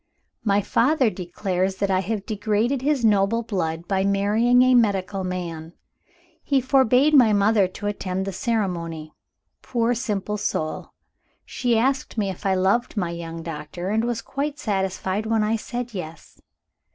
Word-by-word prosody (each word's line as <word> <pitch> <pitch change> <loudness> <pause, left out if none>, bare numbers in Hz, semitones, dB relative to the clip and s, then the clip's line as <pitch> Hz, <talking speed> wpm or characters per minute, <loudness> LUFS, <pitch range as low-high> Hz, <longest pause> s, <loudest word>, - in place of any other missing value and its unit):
"My 205 -1 +2
father 255 +2 +2
declares 185 0 -2
that 195 +1 -1
I 185 - +3
have 200 +1 -3
degraded 215 +4 0
his 275 -3 +1
noble 210 +2 +3
blood 170 -6 -3
by 190 -1 +1
marrying 210 +5 +3
a 255 0 +4
medical 200 -4 +2
man. 170 -3 -5 0.7
He 275 -2 +1
forbade 265 +2 +3
my 245 -7 +6
mother 205 -1 +3
to 195 +3 -9
attend 190 -2 -2
the 195 - -4
ceremony. 170 -8 -2 0.5
Poor 235 -1 0
simple 210 -4 -2
soul! 155 -6 -3 0.5
She 240 -3 0
asked 260 +1 0
me 200 -3 0
if 190 +2 -5
I 190 - +2
loved 195 +6 +1
my 175 -4 -1
young 165 -1 -6
doctor, 165 +3 -6
and 220 +2 +1
was 235 -1 -2
quite 285 +1 -3
satisfied 195 - -2
when 220 -1 +2
I 215 +2 +1
said 240 +1 -5
Yes. 165 -4 -9
205 Hz, 150 wpm, -23 LUFS, 185-235 Hz, 0.7 s, my